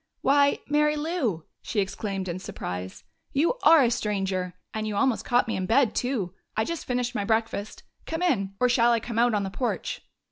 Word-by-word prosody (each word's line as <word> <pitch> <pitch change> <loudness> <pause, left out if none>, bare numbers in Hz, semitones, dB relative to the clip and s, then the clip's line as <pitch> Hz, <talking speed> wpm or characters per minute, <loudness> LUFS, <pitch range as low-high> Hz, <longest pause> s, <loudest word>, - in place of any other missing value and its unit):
"Why, 280 +1 +4
Mary 300 +1 +2
Lou!" 295 - -2 0.2
she 220 - -2
exclaimed 195 -1 -2
in 175 +1 -3
surprise. 90 - -6 0.3
"You 335 - +1
are 320 -3 +7
a 240 - +2
stranger! 195 -5 -1 0.2
And 215 0 -2
you 210 - -3
almost 255 +2 +1
caught 245 +1 +2
me 225 - -1
in 185 -1 -2
bed, 235 0 +3
too! 235 -9 -1 0.2
I 220 - +3
just 335 -1 -4
finished 245 0 -1
my 205 - -1
breakfast. 220 -1 -1 0.2
Come 325 +2 -2
in 195 - +1
or 250 - +4
shall 240 -1 +4
I 230 - +2
come 230 0 -3
out 240 -1 +3
on 205 - 0
the 195 - -4
porch?" 245 +4 -3
230 Hz, 200 wpm, -26 LUFS, 195-270 Hz, 0.3 s, are